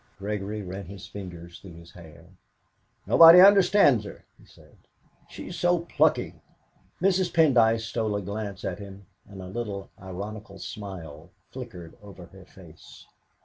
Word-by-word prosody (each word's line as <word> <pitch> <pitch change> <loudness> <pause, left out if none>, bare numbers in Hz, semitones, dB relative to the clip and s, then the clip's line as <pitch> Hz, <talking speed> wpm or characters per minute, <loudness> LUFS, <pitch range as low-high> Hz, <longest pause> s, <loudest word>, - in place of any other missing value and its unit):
Gregory 105 +1 -5
ran 95 +1 -7
his 95 -1 -10
fingers 85 -3 -10
through 90 -4 -13
his 85 0 -15
hair. 80 -4 -15 0.8
"Nobody 165 +1 +8
understands 190 - +5
her," 100 - -12
he - - -20
said; - - -21 0.5
"she's - - -9
so 175 -1 +1
plucky!" 170 - 0 0.6
Mrs. 185 -1 +1
Pendyce 115 -8 +3
stole 110 -2 -3
a 100 - -2
glance 100 0 -6
at - - -4
him, 100 -1 -11 0.2
and 95 -2 -10
a - - -9
little 100 -1 -6
ironical 100 +2 -8
smile 90 -6 -9 0.2
flickered 100 -11 -10
over 100 -3 -13
her 95 +1 -17
face. 85 -4 -16
100 Hz, 140 wpm, -25 LUFS, 95-115 Hz, 0.8 s, Nobody